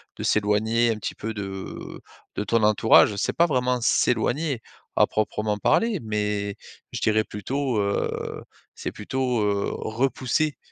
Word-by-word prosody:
de - - -6
s'éloigner 110 +3 +2
un - - -1
petit 105 - -5
peu 110 +1 -4
de, 105 - -5
heu, 95 0 -7 0.4
de 105 - -1
ton 115 +3 +1
entourage. 105 0 +5
C'est - - -1
pas 170 - +4
vraiment 125 -4 +1
s'éloigner, 130 +3 +1 0.4
à - - +7
proprement 105 0 -1
parler 225 - +2
mais 105 -1 -2 0.4
je - - -5
dirais 110 0 +3
plutôt, 125 +5 -2
heu, 100 0 -2 0.3
c'est - - -5
plutôt, 125 +1 -1
heu, 100 -1 0
repousser 130 +5 0
110 Hz, 145 wpm, -25 LUFS, 105-125 Hz, 0.4 s, à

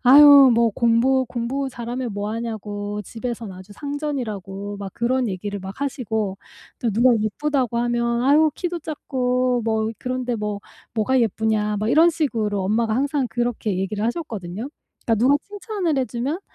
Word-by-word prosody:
"아유 280 +1 +9
뭐 230 0 +3
공부 240 +4 +3
공부 260 +3 -2
잘하면 240 0 -4
뭐하냐고 205 -1 -4
집에선 230 0 -5
아주 185 +2 -12
상전이라고." 215 -8 -4
막 200 -1 -6
그런 245 0 0
얘기를 200 +2 -4
막 190 +6 -8
하시고 220 -8 -2 0.4
또 235 - 0
누가 240 +5 +4
예쁘다고 250 +2 0
하면 235 0 0
"아유 305 +3 +5
키도 350 -2 -3
작고 255 -5 -1
뭐 220 -1 0
그런데 250 -1 -2
뭐 210 -2 -3 0.4
뭐가 245 +4 +2
예쁘냐?" 215 -1 0
막 215 - -1
이런 325 +7 +6
식으로 225 -11 -1
엄마가 220 +3 +1
항상 275 -1 0
그렇게 230 -3 -1
얘기를 205 +2 -2
하셨거든요. 225 - -4 0.4
그러니까 230 - +3
누가 255 +6 +4
칭찬을 405 -6 -3
해주면 265 +5 -2
235 Hz, 335 characters per minute, -22 LUFS, 210-265 Hz, 0.4 s, 아유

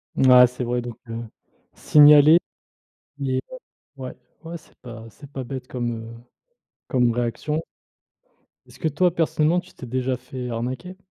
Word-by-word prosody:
Ouais 125 -1 +7
c'est 125 +1 -6
vrai, 120 0 -1
donc 120 -2 -8
heu, 115 +1 -5 0.5
signaler, 150 +2 +7 0.8
mais, 130 -2 -1
heu, - - -6 0.4
ouais. 130 -1 -8 0.3
Ouais 165 +1 -6
c'est 160 - -17
pas 115 -2 -11
c'est 140 +7 -15
pas 135 -2 -5
bête 130 0 -7
comme, 120 -2 -3
heu, 115 0 -7 0.7
comme 125 -2 +2
réaction. 120 +7 -2 1.0
Est-ce - - -18
que - - 0
toi 170 +4 +1
personnellement 165 0 +1
tu 180 +1 -13
t'es 125 - -10
déjà 130 +1 -1
fait 125 0 -7
arnaquer? 130 +11 -5
130 Hz, 150 wpm, -23 LUFS, 120-150 Hz, 1.0 s, Ouais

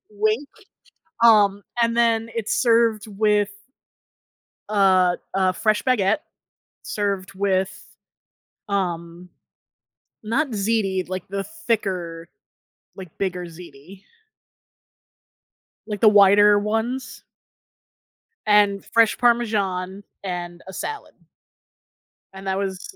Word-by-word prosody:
wink. 215 +6 -1 0.8
Um, 205 -3 +5 0.2
and 230 0 +2
then, 230 -1 +2
it's 220 -2 -1
served 230 -3 +3
with 210 0 +1 1.2
a 190 -3 +3 0.2
a 190 -1 +2
fresh 215 +3 +1
baguette, 220 -3 +2 0.6
served 200 -3 -3
with, 190 -1 +1 1.0
um 175 -2 -3 1.0
not 275 +7 0
ziti, 200 -3 0
like, 185 -1 -5
the 195 0 -3 0.2
thicker, 180 -7 -2 0.7
like, 185 -4 -11
bigger 180 -2 -3
ziti. 170 +2 -13 1.8
Like 210 -2 -5
the 220 - +8
wider 205 0 +6
ones 225 +5 -3 1.2
and 205 -2 +3
fresh 230 -1 +3
parmesan 205 -6 0 0.2
and 175 -2 -5
a 190 - -9
salad. 435 - -6 1.2
And 195 0 -9
that 190 0 0
was 195 - -5
200 Hz, 90 wpm, -22 LUFS, 185-220 Hz, 1.8 s, the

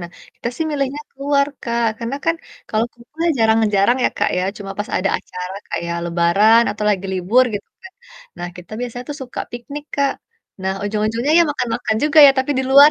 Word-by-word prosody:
Nah, 175 - -6 0.3
kita 235 - -4
sih 320 - -1
milihnya 280 0 -2
keluar, 280 0 +1 0.2
Kak. 235 -1 0
Karena 235 +4 -3
kan 330 - +3 0.3
kalau 220 +1 +1
kumpul 240 +6 -21
ya - - +4
jarang-jarang 220 0 +3
ya - - +5
Kak, - - +2
ya. - - 0 0.2
Cuma 195 -1 -7
pas 205 - -3
ada 195 - +1
acara 180 +1 -7
kayak 170 0 -3
lebaran 175 +7 +4
atau 210 0 -4
lagi 195 -1 -1
libur 205 +8 +3
gitu 205 - -6
kan. 380 0 -12 0.5
Nah, 175 - -4
kita 180 +3 -12
biasanya 245 0 -5
tuh 290 - -4
suka 250 - -6
piknik, 280 +5 -7
Kak. 280 -1 +2 0.5
Nah, 190 - 0
ujung-ujungnya 220 +7 0
ya 340 - +7
makan-makan 235 -5 -1
juga 305 +1 +3
ya - - +8
tapi 265 +2 0
di 265 - +1
luar. 285 +2 +9
235 Hz, 195 wpm, -19 LUFS, 200-275 Hz, 0.5 s, luar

